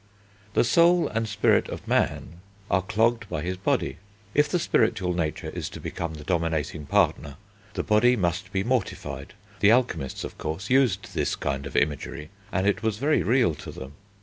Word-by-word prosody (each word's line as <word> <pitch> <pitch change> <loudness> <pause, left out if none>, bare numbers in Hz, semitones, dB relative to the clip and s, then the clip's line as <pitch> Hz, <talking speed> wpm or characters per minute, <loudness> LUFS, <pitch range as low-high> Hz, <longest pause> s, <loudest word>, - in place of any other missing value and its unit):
The - - +5
soul 170 +7 +4
and 115 +1 -1
spirit - - +2
of - - -7
man 85 +5 0 0.3
are 95 - +3
clogged 115 +2 +1
by 75 - -3
his 90 +2 -2
body. 95 - -1 0.4
If 150 0 +3
the 180 - +1
spiritual 110 - +1
nature 80 -3 -2
is - - -4
to - - -9
become 85 -2 -4
the 75 - -9
dominating 80 -3 -1
partner, 70 0 +1 0.4
the - - -1
body 120 +3 +4
must 90 -2 -1
be 95 0 0
mortified: 120 -4 -3 0.2
the 105 - +6
alchemists, 115 - 0
of - - -8
course, 80 +8 -4
used 130 -8 +2
this - - 0
kind 70 +1 -3
of - - -10
imagery, 75 +1 -1 0.2
and 95 -2 0
it 100 +2 +1
was 110 -2 -1
very 150 +6 +2
real 120 -7 +3
to - - -9
them. 65 +1 -9
95 Hz, 175 wpm, -26 LUFS, 80-115 Hz, 0.4 s, the